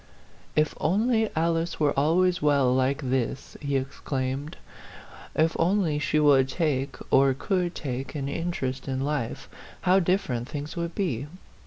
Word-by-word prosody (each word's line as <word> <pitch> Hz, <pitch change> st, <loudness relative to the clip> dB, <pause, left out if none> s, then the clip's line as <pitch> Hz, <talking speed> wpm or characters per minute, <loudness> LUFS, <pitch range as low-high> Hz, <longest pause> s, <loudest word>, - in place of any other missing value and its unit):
"If 155 Hz, 0 st, +2 dB
only 220 Hz, +5 st, +2 dB
Alice 165 Hz, +1 st, 0 dB
were 150 Hz, -2 st, +3 dB
always 175 Hz, +5 st, +2 dB
well 140 Hz, -4 st, +3 dB
like 135 Hz, +3 st, +1 dB
this 130 Hz, 0 st, -2 dB
!" -, -, -26 dB
he 140 Hz, -1 st, -1 dB
exclaimed; 135 Hz, +2 st, -3 dB, 0.4 s
" -, -, -17 dB
if 165 Hz, -, -3 dB
only 170 Hz, -3 st, +2 dB
she 155 Hz, +1 st, +1 dB
would 140 Hz, -3 st, +5 dB
take, 140 Hz, -3 st, -1 dB, 0.2 s
or 135 Hz, 0 st, +5 dB
could 180 Hz, +2 st, -1 dB
take, 130 Hz, -1 st, -4 dB
an 140 Hz, -2 st, -3 dB
interest 140 Hz, -4 st, -3 dB
in 130 Hz, 0 st, -2 dB
life, 140 Hz, -5 st, -2 dB, 0.3 s
how 185 Hz, +2 st, +4 dB
different 170 Hz, -, 0 dB
things 145 Hz, +3 st, -5 dB
would 170 Hz, -1 st, -3 dB
be! 145 Hz, -, -1 dB
150 Hz, 150 wpm, -26 LUFS, 135-170 Hz, 0.4 s, would